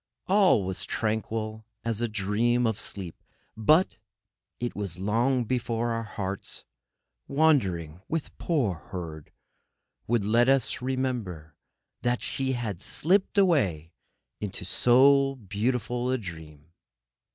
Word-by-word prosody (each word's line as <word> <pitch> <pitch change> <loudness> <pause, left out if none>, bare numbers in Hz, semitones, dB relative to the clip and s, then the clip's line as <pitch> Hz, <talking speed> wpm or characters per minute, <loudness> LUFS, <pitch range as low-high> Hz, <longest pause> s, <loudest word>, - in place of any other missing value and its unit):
All 190 - +4
was 95 0 -2
tranquil 110 0 -2 0.2
as 115 -1 -1
a 120 - +1
dream 110 +4 +1
of 110 -1 0
sleep. 95 -5 -6 0.3
But 155 - +3 0.6
it 120 0 -3
was 100 -4 -3
long 120 +7 +1
before 120 -1 -1
our 115 0 -1
hearts, 100 -3 -5 0.6
wandering 95 - +2
with 165 -2 -3
poor 140 - +1
Herd, 85 -4 -8 0.8
would 115 -3 +1
let 120 +4 +4
us 135 -2 +2
remember 120 - -3 0.5
that 120 0 0
she 130 -1 -1
had 110 -7 -3
slipped 190 - +1
away 100 - +2 0.5
into 100 -3 -4
so 135 +7 +5
beautiful 120 +3 -1
a 130 - +2
dream. 80 - -10
115 Hz, 115 wpm, -27 LUFS, 95-130 Hz, 0.8 s, so